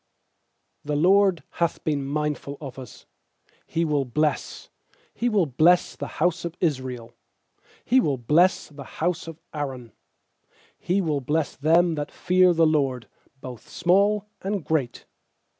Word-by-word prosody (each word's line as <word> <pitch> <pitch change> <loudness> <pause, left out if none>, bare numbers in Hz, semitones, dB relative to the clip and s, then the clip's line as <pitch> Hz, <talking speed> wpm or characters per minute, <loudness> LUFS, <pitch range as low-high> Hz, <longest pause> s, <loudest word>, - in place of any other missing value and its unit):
"The 150 0 -2
LORD 185 +2 +4
hath 170 -1 -2
been 145 -3 -1
mindful 150 -1 -3
of 135 -3 -8
us, 125 -4 -12 0.6
He 165 +1 -1
will 150 -3 +1
bless 150 +4 -2 0.2
— - - -35
He 245 - -1
will 205 -6 +2
bless 160 +6 +3
the - - -5
house 170 +1 +1
of 170 0 -6
Israel; 130 -7 -2 0.7
He 255 +2 +4
will 145 - +1
bless 155 +10 +2
the 145 -2 -11
house 175 +1 -1
of 165 -1 -9
Aaron. 130 -6 -5 0.9
13He 190 +2 +1
will 150 -4 -1
bless 150 +3 -1
them 165 +4 +3
that 145 -2 -4
fear 185 0 +3
the 165 -1 +3
LORD, 135 -6 0 0.3
Both 125 -4 -10
small 200 +3 +2 0.2
and 195 -3 -3
great. 145 -7 -2
155 Hz, 140 wpm, -24 LUFS, 140-175 Hz, 0.9 s, LORD